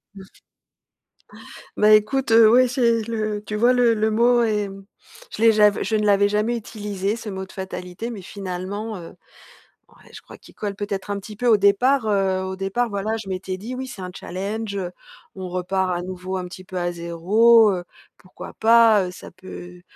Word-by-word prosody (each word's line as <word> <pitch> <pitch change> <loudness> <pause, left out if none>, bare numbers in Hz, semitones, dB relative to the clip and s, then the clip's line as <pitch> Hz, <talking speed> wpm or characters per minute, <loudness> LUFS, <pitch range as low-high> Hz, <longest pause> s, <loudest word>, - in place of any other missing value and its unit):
Mmh. 195 - -11 1.5
Bah, 210 0 +5
écoute, 225 +5 +3
heu, 225 0 +7
ouais, 255 +1 +5
c'est 235 -2 +1
le 215 -2 -3
tu 210 - -5
vois 240 +4 +4
le 240 -2 +3
le 215 +1 0
mot 240 +2 +3
est, 210 -2 0
mmh, 195 0 -12 0.5
je - - -7
l'ai 230 0 +7
j'av 210 -1 +3
je 220 - -1
ne 210 0 0
l'avais 200 0 +4
jamais 215 +3 0
utilisé 205 -2 -4
ce 225 -2 -7
mot 190 -1 -5
de - - -15
fatalité, 190 +3 -6
mais 205 -4 -8
finalement, 200 +3 -6
heu. 170 +1 -11 0.7
Ouais, - - -21
je - - -10
crois - - -14
qu'il - - -18
colle 205 -2 -5
peut-être 205 -1 -5
un 200 - -2
petit 210 +2 -10
peu. 245 +4 -2
Au 225 -3 +6
départ, 220 +6 +3
heu, 195 -2 +1
au 190 0 -4
départ 195 +5 -1
voilà, 210 +2 -2
je 210 -3 -9
m'étais 185 0 -4
dit: 225 +7 -7
«Oui, 260 +1 -5
c'est 240 -6 -9
un 180 - -6
challenge, 200 +3 -5
heu, 185 -3 -4 0.4
on 190 -1 -6
repart 185 0 -1
à - - -4
nouveau 185 +1 -5
un 180 - -4
petit 185 +1 -10
peu 185 0 -8
à 175 0 -1
0, 200 +7 +4
heu, 180 -2 -3 0.3
pourquoi 185 - -12
pas, 225 -3 +5
heu? 180 - -6
Ça - - -12
peut 180 -1 -11
205 Hz, 200 wpm, -22 LUFS, 190-225 Hz, 1.5 s, heu